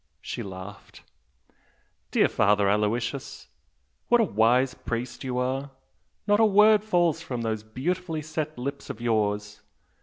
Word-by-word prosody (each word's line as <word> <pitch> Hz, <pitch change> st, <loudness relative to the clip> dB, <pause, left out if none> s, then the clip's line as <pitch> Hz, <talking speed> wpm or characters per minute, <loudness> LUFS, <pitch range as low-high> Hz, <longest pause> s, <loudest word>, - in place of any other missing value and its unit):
She -, -, -6 dB
laughed. 95 Hz, +1 st, -10 dB, 1.1 s
"Dear -, -, +3 dB
Father 100 Hz, 0 st, +2 dB
Aloysius, 115 Hz, +6 st, -1 dB, 0.6 s
what 240 Hz, -, +4 dB
a -, -, +5 dB
wise 125 Hz, -, +2 dB
priest 120 Hz, +2 st, -5 dB
you 125 Hz, -1 st, -3 dB
are! 130 Hz, +2 st, -1 dB, 0.6 s
Not 205 Hz, 0 st, +3 dB
a -, -, +6 dB
word 210 Hz, 0 st, +5 dB
falls 175 Hz, -6 st, +1 dB
from 125 Hz, -8 st, -4 dB
those 110 Hz, -1 st, -2 dB
beautifully 155 Hz, +8 st, -3 dB
set 155 Hz, 0 st, -4 dB
lips 140 Hz, +3 st, -5 dB
of -, -, -6 dB
yours! 105 Hz, -2 st, -1 dB
125 Hz, 130 wpm, -26 LUFS, 110-160 Hz, 1.1 s, a